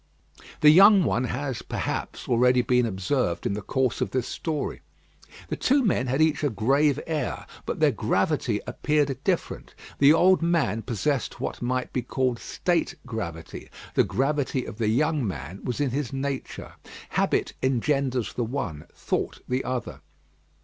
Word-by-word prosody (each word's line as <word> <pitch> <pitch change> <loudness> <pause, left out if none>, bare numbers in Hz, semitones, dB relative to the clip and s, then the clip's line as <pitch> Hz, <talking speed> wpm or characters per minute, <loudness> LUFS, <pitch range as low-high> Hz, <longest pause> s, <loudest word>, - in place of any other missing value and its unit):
The 150 - +8
young 195 +3 +8
one 125 -5 +1
has, 125 0 -3
perhaps, - - -4
already 125 +1 +4
been 125 -1 +2
observed 95 -2 -1
in - - 0
the 105 - -3
course 130 +4 -1
of - - 0
this 130 -1 -2
story. 155 -3 -3 0.7
The - - -1
two 275 0 +2
men 130 - +1
had 135 +5 +2
each 155 -2 +1
a 145 - +3
grave 135 +6 +2
air; 160 -2 -3 0.2
but - - -3
their - - +4
gravity - - 0
appeared 145 -2 0
different. - - -2 0.2
The 140 +1 +7
old 180 +3 +5
man 165 - +1
possessed 125 +4 -2
what - - -4
might 125 +1 -2
be 125 - 0
called 125 0 -1
state 175 -2 -1
gravity; 85 -9 -6 0.2
the - - +4
gravity 135 -1 -1
of 105 - -9
the 110 -2 +1
young 145 +2 +1
man 85 +2 -6
was 125 - -3
in 140 -3 +1
his 135 -1 -2
nature. 135 0 -4 0.4
Habit - - 0
engenders 130 -1 0
the 120 - -1
one; 110 - -4
thought - - -3
the 130 +1 -1
other. 125 -2 -4
130 Hz, 155 wpm, -26 LUFS, 120-145 Hz, 0.7 s, The